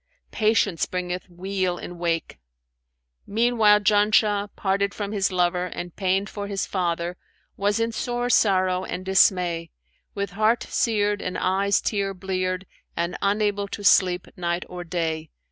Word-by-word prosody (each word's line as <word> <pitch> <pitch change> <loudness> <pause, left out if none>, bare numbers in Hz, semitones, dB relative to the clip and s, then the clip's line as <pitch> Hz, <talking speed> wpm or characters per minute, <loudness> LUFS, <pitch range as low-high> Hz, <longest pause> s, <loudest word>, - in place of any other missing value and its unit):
Patience 215 -5 +1
bringeth 180 0 -4
weal 185 0 -2
in 175 0 -8
wake.' 165 -1 -2 0.9
Meanwhile 220 -1 +4
Janshah, 210 0 +3
parted 200 0 0
from 205 -1 -4
his 200 -2 0
lover 180 0 +1
and 175 -1 -7
pained 195 +1 0
for 205 -1 -6
his 200 -2 -2
father, 175 -1 -2 0.4
was 205 +2 0
in 230 0 0
sore 240 +2 -2
sorrow 185 -5 +3
and 185 0 -5
dismay, 180 -3 +3 0.5
with 200 -2 -3
heart 215 +4 +2
seared 205 -3 0
and 185 - -3
eyes 195 +1 +2
tear 200 -2 -1
bleared 185 0 -2 0.3
and 170 +1 -1
unable 205 0 +1
to 205 - -7
sleep 180 -2 +4
night 175 0 -2
or 180 0 -7
day. 160 -2 -3
190 Hz, 140 wpm, -24 LUFS, 180-205 Hz, 0.9 s, Meanwhile